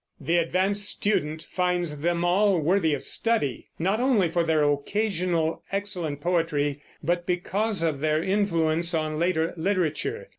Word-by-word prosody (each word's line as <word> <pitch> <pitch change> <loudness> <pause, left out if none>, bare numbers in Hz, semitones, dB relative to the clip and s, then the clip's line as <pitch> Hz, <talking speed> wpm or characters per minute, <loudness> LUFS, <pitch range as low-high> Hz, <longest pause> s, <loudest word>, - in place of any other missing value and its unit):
The 170 +1 +1
advanced 190 +4 +1
student 160 -6 -1
finds 175 -4 -1
them 170 +2 0
all 190 +1 +3
worthy 160 -1 +2
of 135 - -8
study, 225 - -1
not 190 +6 0
only 240 -9 +3
for 170 +1 +1
their 160 -2 +2
occasional 170 +2 0
excellent 180 -7 -3
poetry, 150 -4 0 0.2
but 175 +2 -1
because 195 +2 -1
of 155 -4 0
their 155 +2 +1
influence 170 -4 +1
on 155 -1 -1
later 170 -1 +1
literature. 195 - -1
175 Hz, 140 wpm, -26 LUFS, 155-195 Hz, 0.2 s, all